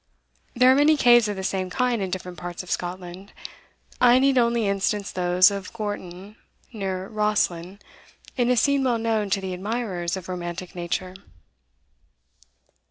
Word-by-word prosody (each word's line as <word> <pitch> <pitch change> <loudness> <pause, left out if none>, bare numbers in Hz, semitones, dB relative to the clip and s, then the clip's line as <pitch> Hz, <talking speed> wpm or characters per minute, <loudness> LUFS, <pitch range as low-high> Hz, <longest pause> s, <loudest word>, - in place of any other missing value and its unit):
There 250 +1 +6
are - - +5
many 295 +2 +4
caves 240 -4 +5
of 205 - -3
the 190 - -6
same 190 -1 -2
kind 245 +2 0
in 190 - -2
different 180 -2 -6
parts 175 +2 -6
of 180 - -10
Scotland. 180 +2 -5 0.7
I 245 0 +6
need 270 +1 +3
only 235 -3 +2
instance 200 +1 -1
those 180 +1 +4
of 200 -2 -6
Gorton, 205 -2 -6 0.4
near 190 -3 -4
Rosslyn, 200 -4 -1 0.6
in 245 -1 +1
a 250 - +2
scene 280 +3 +2
well 245 -3 +1
known 225 -2 -1
to 195 0 +1
the 190 -1 -5
admirers 190 -3 -3
of 185 - -9
romantic 175 0 -6
nature. 180 +1 -4
195 Hz, 155 wpm, -24 LUFS, 180-235 Hz, 0.7 s, There